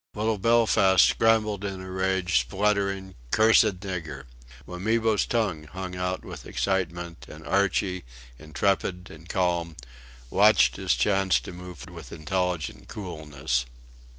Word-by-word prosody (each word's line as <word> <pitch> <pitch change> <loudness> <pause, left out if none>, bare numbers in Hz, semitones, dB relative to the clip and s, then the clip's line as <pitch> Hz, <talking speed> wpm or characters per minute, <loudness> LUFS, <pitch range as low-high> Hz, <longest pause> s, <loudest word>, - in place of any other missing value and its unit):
Little 110 0 0
Belfast 100 -5 +4
scrambled 110 -3 +2
in 100 -2 -4
a 95 0 -8
rage 95 -3 +1
spluttering 95 +6 -1 0.2
"cursed 110 - +4
nigger." 80 -8 -5 0.4
Wamibo's 110 +4 0
tongue 100 -10 -1
hung 90 +3 -7
out 90 0 -3
with - - -9
excitement; 85 -3 -2
and 80 +1 -11
Archie, 95 -1 0 0.4
intrepid 90 +3 -1
and 80 +2 -14
calm, 85 -3 0 0.6
watched - - +5
his - - +1
chance 95 +9 +2
to - - -9
move 90 -1 -10
with - - -11
intelligent 90 0 -3
coolness. 75 - -3
95 Hz, 120 wpm, -26 LUFS, 85-100 Hz, 0.6 s, watched